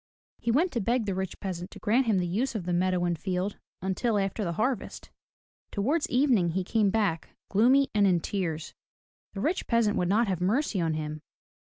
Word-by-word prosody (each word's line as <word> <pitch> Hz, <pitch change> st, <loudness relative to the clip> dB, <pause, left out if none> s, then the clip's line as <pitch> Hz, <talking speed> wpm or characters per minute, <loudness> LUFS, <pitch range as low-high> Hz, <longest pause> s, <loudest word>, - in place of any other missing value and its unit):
He 235 Hz, -, -3 dB
went 320 Hz, +10 st, +3 dB
to 235 Hz, -, -1 dB
beg 235 Hz, +3 st, +1 dB
the 200 Hz, -, -1 dB
rich 190 Hz, -1 st, -4 dB
peasant 180 Hz, -2 st, -5 dB
to -, -, -12 dB
grant 235 Hz, +4 st, +2 dB
him 215 Hz, -3 st, +3 dB
the 180 Hz, -, +1 dB
use 225 Hz, +9 st, -1 dB
of 195 Hz, -5 st, -3 dB
the 175 Hz, -, -1 dB
meadow 180 Hz, 0 st, +1 dB
and 175 Hz, -1 st, +1 dB
field 185 Hz, +2 st, -2 dB, 0.2 s
until 205 Hz, +4 st, 0 dB
after 195 Hz, +2 st, -1 dB
the 170 Hz, -3 st, -2 dB
harvest. 250 Hz, +7 st, -2 dB, 0.6 s
Towards 285 Hz, +11 st, 0 dB
evening 245 Hz, -, +3 dB
he 190 Hz, +1 st, 0 dB
came 210 Hz, +2 st, +2 dB
back, 195 Hz, -6 st, -1 dB, 0.2 s
gloomy 255 Hz, +7 st, +4 dB
and 205 Hz, -2 st, +4 dB
in 180 Hz, -2 st, +3 dB
tears. 165 Hz, -4 st, -3 dB, 0.6 s
The 195 Hz, -, -5 dB
rich 330 Hz, -, -1 dB
peasant 230 Hz, -3 st, +2 dB
would 180 Hz, -, 0 dB
not 220 Hz, +4 st, +3 dB
have 185 Hz, -3 st, -2 dB
mercy 210 Hz, +1 st, +1 dB
on 165 Hz, -2 st, 0 dB
him. 155 Hz, 0 st, -4 dB
200 Hz, 200 wpm, -28 LUFS, 180-235 Hz, 0.6 s, gloomy